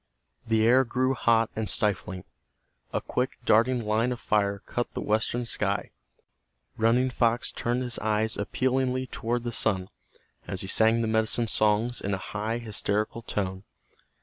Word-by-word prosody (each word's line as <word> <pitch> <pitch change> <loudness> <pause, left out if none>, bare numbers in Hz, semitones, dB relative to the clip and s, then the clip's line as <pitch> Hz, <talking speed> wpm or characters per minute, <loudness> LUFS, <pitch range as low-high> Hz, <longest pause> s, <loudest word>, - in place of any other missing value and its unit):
The 110 0 +3
air 130 +2 +6
grew 130 +2 0
hot 115 -2 +2
and 110 -1 -2
stifling. 95 -3 -1 0.7
A - - -1
quick, 125 +1 -2
darting 115 +2 +3
line 110 +4 +1
of 125 - -4
fire 100 -1 0
cut 120 - -3
the - - -2
western 110 +3 0
sky. 100 -3 -1 0.8
Running 120 +3 +2
Fox 120 -1 +1
turned 120 +2 -1
his 120 -1 -4
eyes 110 0 0
appealingly 130 +4 0
toward 120 -1 -3
the 120 - -3
sun, 95 -4 0 0.6
as 95 - -3
he 95 - -4
sang 115 +3 +4
the - - 0
medicine 110 +1 +1
songs 110 +2 +2
in 100 0 -1
a 95 - -8
high, 110 +2 -1
hysterical 110 0 -2
tone. 95 -3 -3
110 Hz, 150 wpm, -27 LUFS, 105-120 Hz, 0.8 s, air